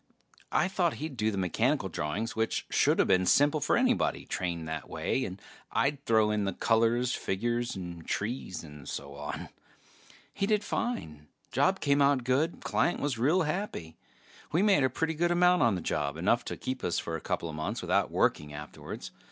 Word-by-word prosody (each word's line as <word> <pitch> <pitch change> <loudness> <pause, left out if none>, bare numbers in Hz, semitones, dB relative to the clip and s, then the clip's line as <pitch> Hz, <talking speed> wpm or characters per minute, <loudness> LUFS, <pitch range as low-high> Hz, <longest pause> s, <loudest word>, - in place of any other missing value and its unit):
I 155 - +3
thought 180 -4 +1
he'd 155 -2 -5
do 110 -2 +1
the 100 - -3
mechanical 90 -3 +1
drawings, 100 +10 -3
which 110 0 -1
shoulda - - +3
been 90 0 +3
simple 145 - +4
for - - +2
anybody 250 0 +1
trained 85 -3 -3
that 80 -1 -5
way, 130 - -1
and 95 +1 -7 0.3
I'd 140 0 0
throw 110 -2 +4
in 105 -1 0
the 95 - -1
colors, 115 +4 +2
figures 120 +5 -1
and 85 -3 -7
trees 100 -4 -3
and 75 -3 -10
so 70 0 -5
on. 75 +1 -6 0.8
He 195 - -1
did 210 -1 +2
fine. 75 - -3 0.2
Job - - +2
came 140 0 +3
out 140 -2 +4
good; 135 +7 0
client 175 - +1
was 140 -5 -1
real 160 +9 +3
happy. 150 - -3 0.6
We 170 +5 +3
made 195 -9 +4
a 130 - +3
pretty 160 +6 -1
good 170 +2 +1
amount 180 +1 +4
on 115 -4 +4
the 90 - -3
job, 70 0 -1
enough 115 +8 +2
to - - -4
keep 130 0 -4
us 85 - 0
for 85 - -3
a 80 - -5
coupla 85 -2 -3
months 75 0 -3
without - - +2
working 75 0 +1
afterwards. 75 0 -8
115 Hz, 185 wpm, -30 LUFS, -, 0.8 s, simple